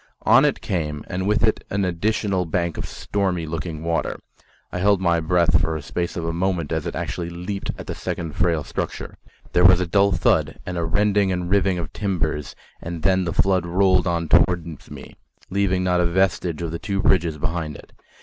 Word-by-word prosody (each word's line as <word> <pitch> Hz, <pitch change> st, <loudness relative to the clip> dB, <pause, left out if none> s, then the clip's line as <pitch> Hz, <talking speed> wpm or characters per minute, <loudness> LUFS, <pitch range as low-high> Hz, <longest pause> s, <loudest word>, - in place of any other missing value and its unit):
On -, -, +6 dB
it -, -, 0 dB
came, 75 Hz, -5 st, -3 dB
and 95 Hz, +2 st, -2 dB
with 105 Hz, +2 st, +2 dB
it 110 Hz, -1 st, +2 dB
an 100 Hz, 0 st, 0 dB
additional 95 Hz, +1 st, 0 dB
bank 85 Hz, 0 st, -1 dB
of -, -, -4 dB
stormy 95 Hz, -5 st, -2 dB
looking 80 Hz, 0 st, -5 dB
water. 85 Hz, 0 st, -1 dB, 0.5 s
I -, -, -3 dB
held 100 Hz, +1 st, +3 dB
my 85 Hz, -2 st, +2 dB
breath 85 Hz, +1 st, +3 dB
for 80 Hz, 0 st, 0 dB
the 75 Hz, -, -8 dB
space 85 Hz, +4 st, -3 dB
of 85 Hz, -, -3 dB
a 85 Hz, -, -1 dB
moment 85 Hz, -3 st, -1 dB
as -, -, -1 dB
it -, -, -4 dB
actually 85 Hz, -1 st, -3 dB
leaped 90 Hz, +3 st, -5 dB
at -, -, -8 dB
the -, -, -4 dB
second 80 Hz, -3 st, -4 dB
frail 80 Hz, -2 st, +1 dB
structure; -, -, -5 dB, 0.3 s
there 90 Hz, -, +4 dB
was 90 Hz, 0 st, +7 dB
a 90 Hz, -, 0 dB
dull 100 Hz, +3 st, +3 dB
thud 95 Hz, -, +1 dB
and 90 Hz, -, -4 dB
a 85 Hz, -, -1 dB
rending 100 Hz, +2 st, +2 dB
and 90 Hz, 0 st, -2 dB
riving 95 Hz, -2 st, +2 dB
of 80 Hz, -3 st, -5 dB
timbers, 85 Hz, -8 st, -2 dB, 0.3 s
and 85 Hz, -1 st, -6 dB
then 95 Hz, -1 st, +3 dB
the 85 Hz, -, -1 dB
flood 95 Hz, -2 st, +2 dB
rolled 95 Hz, 0 st, +3 dB
on 85 Hz, -1 st, 0 dB
towards 85 Hz, +1 st, +1 dB
me, -, -, -11 dB, 0.3 s
leaving 95 Hz, -1 st, +1 dB
not 90 Hz, -1 st, +2 dB
a 85 Hz, -, +2 dB
vestige 90 Hz, -2 st, 0 dB
of 85 Hz, -, -3 dB
the 85 Hz, -, -4 dB
two 100 Hz, -1 st, -2 dB
bridges 85 Hz, -4 st, +2 dB
behind 80 Hz, -1 st, -3 dB
it. -, -, -14 dB
90 Hz, 205 wpm, -22 LUFS, 85-95 Hz, 0.5 s, was